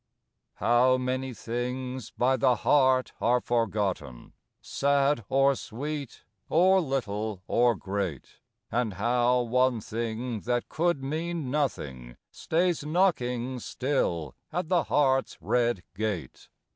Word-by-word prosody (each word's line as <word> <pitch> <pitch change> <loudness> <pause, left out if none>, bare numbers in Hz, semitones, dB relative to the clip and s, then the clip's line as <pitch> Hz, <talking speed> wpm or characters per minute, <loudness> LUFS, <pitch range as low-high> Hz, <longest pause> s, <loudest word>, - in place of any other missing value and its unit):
II - - -54 0.2
How 125 +2 +5
many 130 +1 -2
things 125 +2 -4
by 130 +2 +1
the 130 -1 +3
heart 130 +1 +3
are 125 +1 +3
forgotten! 100 - -2 0.3
Sad 140 -2 +1
or 135 +1 +4
sweet, 140 +2 -6 0.3
or 185 +4 +5
little 110 - -3
or 120 -1 +3
great! 95 -7 -4 0.3
And 115 -2 0
how 120 +4 +2
one 125 0 +2
thing 115 +2 -4
that 120 +2 -2
could 170 -4 0
mean 160 0 -3
nothing 70 - -3
Stays 170 -1 0
knocking 130 -7 0
still 90 - -1 0.2
at 175 -2 -2
the 175 -4 +2
heart's 135 -2 +2
red 120 -4 0
gate! 105 -4 -4
125 Hz, 115 wpm, -28 LUFS, 115-140 Hz, 0.3 s, How